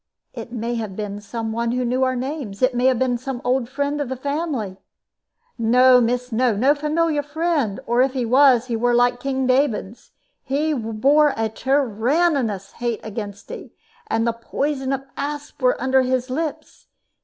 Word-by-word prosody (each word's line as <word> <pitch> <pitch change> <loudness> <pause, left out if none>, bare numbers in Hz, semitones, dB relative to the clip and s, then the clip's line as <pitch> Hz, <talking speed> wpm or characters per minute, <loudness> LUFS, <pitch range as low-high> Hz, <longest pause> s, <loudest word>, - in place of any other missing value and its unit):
It 230 -1 -8
may 235 0 -3
have 205 -4 -6
been 205 -1 -5
some 225 +2 -4
one 235 +1 -1
who 250 0 0
knew 250 +2 0
our 255 0 +1
names. 255 -5 -4
It 255 0 +4
may 245 +1 0
have 260 -2 +3
been 245 -1 0
some 260 0 -5
old 250 -1 +1
friend 285 +2 -2
of 280 - -3
the 260 - -2
family." 280 - -3 0.8
"No, 250 +2 +5
miss, 245 +1 -1
no! 235 0 +2
No 260 +8 +4
familiar 300 +1 0
friend; 295 - -1
or 240 +2 +2
if 260 0 +2
he 255 -3 -1
was, 255 0 +5
he 240 -2 -2
were 240 +1 +2
like 245 0 +3
King 265 0 -1
David's. 255 -5 0 0.3
He 300 +3 -1
bore 270 +5 +2
a 225 0 0
tyrannous 255 - 0
hate 235 -2 -3
against 205 -2 -7
'e, - - -9 0.3
and 225 - 0
the 235 - +1
poison 270 +3 -2
of 270 0 -2
asps 290 0 -5
were 250 0 +2
under 265 +1 +3
his 255 0 -1
lips. 310 +2 -5
255 Hz, 180 wpm, -22 LUFS, 230-280 Hz, 0.8 s, No